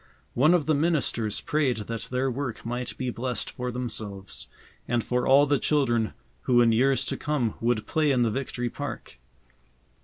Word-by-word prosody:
One 150 +8 +5
of 160 -5 +1
the 155 - +2
ministers 140 -9 0
prayed 145 -6 +1
that 110 +1 -5
their 130 +1 0
work 130 -3 -4
might 120 +1 -3
be 130 -1 -2
blessed 125 +1 -3
for 125 0 -4
themselves, 100 - -4 0.4
and 120 -1 +1
for 125 0 0
all 140 +2 +7
the 145 -1 +2
children 120 -7 +1 0.3
who 125 -1 +4
in 120 -1 +5
years 130 +4 +3
to - - -2
come 140 -7 -1
would 115 -2 +1
play 155 -2 +1
in 125 -3 +3
the 115 - +1
Victory 120 -1 -3
Park. - - -7
125 Hz, 175 wpm, -26 LUFS, 115-140 Hz, 0.4 s, all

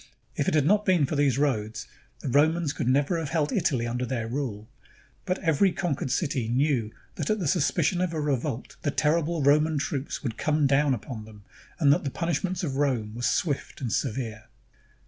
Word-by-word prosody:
If - - -1
it - - +2
had 150 -3 +3
not 210 +5 +4
been 180 -7 +3
for 150 - -3
these 140 -3 +2
roads, 110 -7 -1 0.4
the - - -5
Romans 155 +3 +2
could 135 - -3
never 145 +6 +2
have 160 -3 -4
held 155 -2 0
Italy 125 -5 +1
under 120 +1 -2
their 120 -2 -2
rule; 115 -5 -4 0.6
but 185 - +1
every 165 +3 +3
conquered 165 -7 -2
city 135 -4 -1
knew 125 -2 +1 0.3
that - - -2
at 215 - +2
the 180 -7 -2
suspicion 175 +3 +1
of 185 -2 0
a 160 - -3
revolt, 140 -3 -2
the 145 - 0
terrible 155 +2 +1
Roman 150 +2 +4
troops 140 0 -3
would 120 -4 -4
come 150 -1 +2
down 140 0 +3
upon 110 0 -7
them, 105 -2 -14 0.4
and 145 -3 +6
that - - -1
the 140 - -1
punishments 170 +4 -2
of 135 -5 -2
Rome 125 -7 0
were 120 - -7
swift 140 +3 -1
and 120 -5 -3
severe. 110 -4 -2
145 Hz, 195 wpm, -27 LUFS, 125-160 Hz, 0.6 s, and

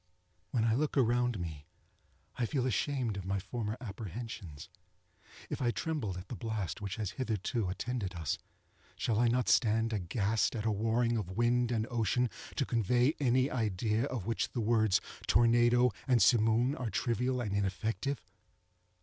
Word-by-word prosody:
When 115 -4 0
I 115 - +3
look 145 +4 0
around 120 -3 +2
me 80 -4 -6 0.7
I 120 - -1
feel 130 -1 0
ashamed 125 -2 0
of 95 - -6
my 100 +1 0
former 110 +3 -4
apprehensions. 105 - -7 0.8
If - - -4
I 120 - +2
trembled 120 - -2
at 90 +1 -8
the 120 - -5
blast 110 -5 -3
which 100 -2 -3
has 105 -4 -3
hitherto 110 -3 -1
attended 100 -1 -3
us, 80 -5 -2 0.6
shall 110 -2 0
I 120 - +4
not 125 +2 +1
stand 115 -1 +3
aghast 105 +4 0
at 110 -1 -3
a 110 - +2
warring 115 +3 +1
of 95 -3 -4
wind 120 +1 +2
and 110 -2 0
ocean, 120 +1 +1 0.2
to 140 - +1
convey 120 +5 +2
any 130 0 +2
idea 110 0 0
of 125 -9 -4
which 115 +1 -1
the 125 - -2
words 110 -3 +3 0.3
tornado 120 +2 +5 0.2
and 125 -2 +4
simoom 115 +4 +4
are 125 -3 -2
trivial 125 +3 0
and 105 -5 -2
ineffective? 110 +7 -1
115 Hz, 160 wpm, -32 LUFS, 105-125 Hz, 0.8 s, tornado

